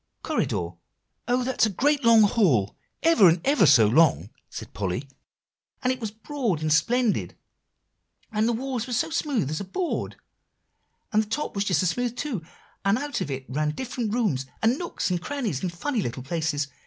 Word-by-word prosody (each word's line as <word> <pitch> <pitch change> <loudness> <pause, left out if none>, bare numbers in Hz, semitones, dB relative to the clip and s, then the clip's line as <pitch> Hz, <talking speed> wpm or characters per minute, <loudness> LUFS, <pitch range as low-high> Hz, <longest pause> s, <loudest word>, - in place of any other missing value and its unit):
"Corridor; 85 - -1 0.6
oh! 250 +1 +1
that's 255 -3 +2
a - - -2
great 285 - +1
long 230 -2 +7
hall, 170 - +2 0.3
ever 320 - +6
and 165 +2 +2
ever 270 - +4
so 115 -5 +7
long," 110 - +3 0.2
said - - -9
Polly; 100 +7 -3 0.8
"and 255 0 +2
it 255 - -8
was 220 -3 -3
broad 220 - -3
and 155 -1 +2
splendid, 230 +8 +1 1.0
and 215 +1 +1
the - - +2
walls 250 0 -3
were - - -7 0.2
as 320 - -5
smooth 255 - 0
as 155 - -2
a - - -4
board, 310 - -3 1.0
and 215 - +4
the 215 - -7
top 295 +7 -2
was 200 0 -1
just 180 -4 +2
as 180 - +2
smooth 245 -1 -2
too, 250 - -3 0.4
and 195 +2 +3
out 285 -1 -3
of - - -3
it 135 -1 -4
ran 150 +3 -1
different 245 -4 -3
rooms, 200 - 0 0.2
and 235 +5 +3
nooks, 345 - -3
and 175 -1 -1
crannies, 230 - -3
and 185 - -2
funny 225 +8 -2
little 125 -4 -4
places. 150 -1 -1
210 Hz, 185 wpm, -25 LUFS, 155-250 Hz, 1.0 s, long